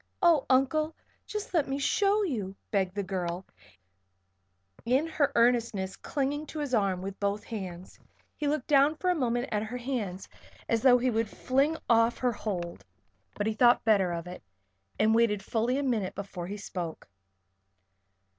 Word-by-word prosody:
"Oh, 335 -7 +4
Uncle! 305 +4 +2 0.3
Just 420 -2 -5
let 320 -5 +2
me 270 0 -2
show 400 +8 +2
you," 210 - -3 0.2
begged 190 -2 0
the 200 - -1
girl, 180 -1 -3 1.4
in 260 +6 +2
her 295 -3 +1
earnestness 230 -5 +2
clinging 290 +2 -2
to 315 - -8
his 285 -3 -3
arm 195 -5 +1
with 195 0 -6
both 200 +1 -1
hands. 185 -5 -7 0.4
He 295 - -2
looked 290 -2 0
down 285 +1 +4
for 365 +3 0
a - - +1
moment 245 -3 0
at 210 - 0
her 220 +3 -4
hands 230 -8 -4 0.4
as 230 -1 +1
though 250 -1 +7
he 250 +1 +1
would 225 -1 0
fling 275 +8 +1
off 230 0 +4
her 250 -1 +1
hold. 175 - -4 0.5
But 205 - -2
he 220 - 0
thought 240 +2 +4
better 200 -5 +3
of 170 0 -4
it, 180 0 -8 0.6
and 220 +1 +3
waited 220 -3 +2
fully 235 +5 0
a 285 - -1
minute 220 -8 -1
before 190 -3 -6
he 205 +2 -5
spoke. 175 -5 -6
230 Hz, 165 wpm, -29 LUFS, 195-275 Hz, 1.4 s, though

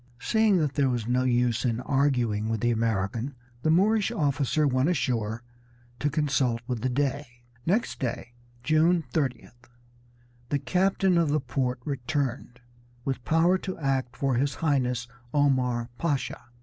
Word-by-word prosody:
Seeing 220 -3 +3
that 150 -5 0
there 140 -2 +2
was 120 -3 -2
no 125 +1 +1
use 120 -2 +1
in 120 -3 0
arguing 125 -7 +1
with 110 -2 -1
the 120 - +2
American 115 +3 -1 0.3
the 155 - +1
Moorish 205 +5 +3
officer 145 0 +1
went 130 +2 +2
ashore 115 -8 -1 0.6
to 145 - +1
consult 135 -5 +1
with 120 -2 -3
the 130 - 0
Dey. 130 -2 -2 0.2
Next 210 +7 0
day, 120 -1 -4 0.3
June 160 +4 +3
30th, 125 -5 -3 0.8
the 145 - +1
captain 185 +5 +2
of 165 -3 +2
the 150 +1 +2
port 125 -1 -2
returned, 130 -2 -3 0.4
with 130 -2 -2
power 170 +4 +3
to 185 -1 -5
act 135 -4 -1
for 135 -1 +1
his 140 +1 0
Highness 125 -6 0 0.3
Omar 125 -4 +1
Pasha. 140 -6 -2
135 Hz, 145 wpm, -27 LUFS, 120-150 Hz, 0.8 s, Seeing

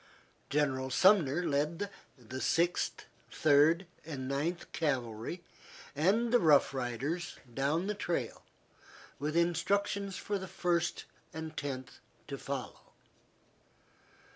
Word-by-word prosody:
General 135 -2 +1
Sumner 175 0 +4
led 155 +7 0 0.3
the 130 +1 -7
Sixth, 170 +1 +1 0.3
Third, 155 +4 +4 0.2
and 140 -5 -5
Ninth 155 +6 -2
Cavalry 130 +1 -2 0.5
and 210 - +2
the 245 - +7
Rough 150 -5 +5
Riders 135 +7 -3 0.2
down 145 +7 +1
the 210 - -1
trail, 170 - -2 0.8
with 150 +4 -1
instructions 195 +3 +1
for 205 -1 -2
the 190 - -6
First 170 -2 0 0.3
and 160 0 -6
Tenth 130 -3 -5 0.3
to 140 -2 -5
follow. 135 -2 -5
155 Hz, 105 wpm, -32 LUFS, 135-175 Hz, 0.8 s, the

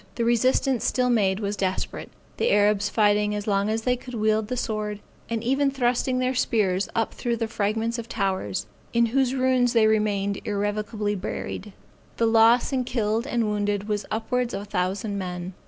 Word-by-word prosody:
The 235 - 0
resistance 250 +2 +2
still 250 -1 +1
made 195 -4 +2
was 205 -1 -2
desperate; 190 -1 -3 0.3
the 470 - +1
Arabs 205 0 +3
fighting 210 -1 +2
as 205 0 -4
long 200 0 +1
as 220 +1 -1
they 250 +1 +2
could 250 0 -9
wield 215 -1 +1
the 250 +2 -3
sword, 210 -2 -3 0.3
and 230 -1 -2
even 270 +3 +2
thrusting 255 -1 0
their 255 0 +1
spears 205 -6 +1
up 225 -1 0
through 240 -1 -2
the 225 0 -1
fragments 220 +2 -1
of 230 0 -7
towers, 190 - -2 0.3
in 235 0 +4
whose 260 +2 +1
ruins 255 -2 +2
they 225 -2 +5
remained 205 -2 +1
irrevocably 205 +1 -2
buried. 200 +1 -5 0.5
The 230 - +2
loss 230 +3 +4
in 255 -1 +1
killed 230 0 -1
and 235 -4 0
wounded 205 -1 -1
was 210 -1 -2
upwards 240 +2 -1
of - - -3
a - - -9
thousand 200 +2 -2
men. 180 0 -5
220 Hz, 180 wpm, -25 LUFS, 205-240 Hz, 0.5 s, they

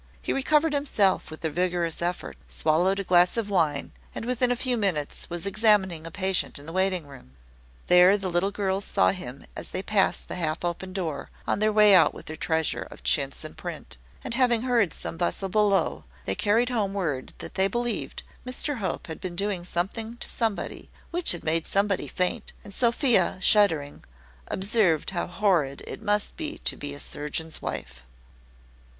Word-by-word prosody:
He - - -2
recovered 300 +3 +2
himself 265 -9 +2
with 155 +1 -8
a 160 - 0
vigorous 175 -1 -1
effort, 175 +1 -3
swallowed 175 +5 +1
a - - -1
glass 180 +2 +4
of 210 -3 -1
wine, 155 -7 +1 0.2
and - - -5
within 250 0 +1
a - - +2
few 250 0 -1
minutes 185 -10 -2
was 175 +1 -3
examining 200 -5 +2
a - - -5
patient 190 0 -1
in 145 - -9
the 165 - -7
waiting 185 -3 +1
room. 135 - -15 0.5
There 180 +3 +6
the 195 -2 -4
little 175 +3 +1
girls 195 -1 -1
saw - - +3
him 140 -8 -8
as - - -6
they 190 - -3
passed 205 -2 +1
the - - -5
half 160 0 -2
open 175 +2 -3
door, 165 -7 -4 0.2
on - - 0
their 215 +1 +3
way 210 -1 +7
out 185 - +6
with - - -10
their 155 - -6
treasure 160 0 0
of - - -13
chintz 60 - 0
and - - -8
print; - - -7 0.3
and - - -4
having 240 -2 +3
heard 235 -8 +2
some 80 0 -4
bustle 85 - -1
below, 205 0 +2 0.2
they - - 0
carried 230 +4 +2
home 205 -5 -1
word 150 -10 -2
that - - -8
they 190 0 +3
believed 240 +2 -3 0.2
Mr 255 +3 -1
Hope 190 -6 -3
had 160 - -8
been 180 -2 -5
doing 195 -1 -1
something 220 +7 -3
to - - -4
somebody 225 -4 -2 0.2
which 350 0 +2
had 175 - -2
made 160 +1 0
somebody 200 -1 +1
faint; 180 0 -2
and 205 - -8
Sophia, 235 - +3
shuddering, 170 -8 +3 0.4
observed 190 -5 +1
how 175 -2 -2
horrid 175 -8 +1
it - - -8
must 210 -1 0
be 315 -1 -4
to - - +3
be 145 -1 -6
a - - -9
surgeon's 150 +3 -4
wife. - - -6
190 Hz, 185 wpm, -26 LUFS, 165-215 Hz, 0.5 s, way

